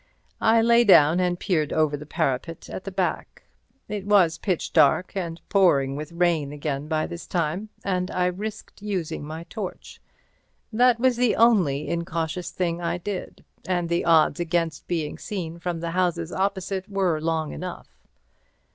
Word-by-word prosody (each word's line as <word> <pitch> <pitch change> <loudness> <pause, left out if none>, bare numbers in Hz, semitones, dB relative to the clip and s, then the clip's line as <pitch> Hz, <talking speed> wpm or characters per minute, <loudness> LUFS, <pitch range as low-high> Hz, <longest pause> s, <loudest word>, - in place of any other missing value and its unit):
I 225 0 +4
lay 235 +1 +5
down 170 -5 +6
and 180 -1 0
peered 155 -6 0
over 155 -2 +2
the 150 +1 -9
parapet 145 +4 -2
at 190 - -6
the 195 - -5
back. 185 -1 -3 0.4
It 210 -2 -4
was 180 -6 +4
pitch 185 -2 -2
dark 185 - +3
and 170 -3 -3
pouring 140 -9 +3
with 150 +3 -6
rain 170 -4 +1
again 145 -1 -4
by 155 -1 0
this 170 - -8
time, 175 +5 -2
and 180 -1 -1
I 180 - 0
risked 205 +4 -5
using 190 -8 -3
my 160 +2 -6
torch. 190 +2 -8 0.7
That 245 +1 +4
was 255 -1 +3
the 245 -2 +2
only 185 -12 +3
incautious 170 0 -3
thing 175 -1 -2
I 170 0 -1
did, 190 +1 -6 0.2
and 175 -2 0
the 170 0 +1
odds 160 -2 +4
against 165 -2 -1
being 160 -4 -3
seen 170 -5 -5
from 170 -1 -3
the 170 0 -3
houses 175 -2 0
opposite 195 0 -2
were 185 -6 0
long 160 -1 -1
enough. 180 -1 -8
175 Hz, 160 wpm, -24 LUFS, 160-195 Hz, 0.7 s, down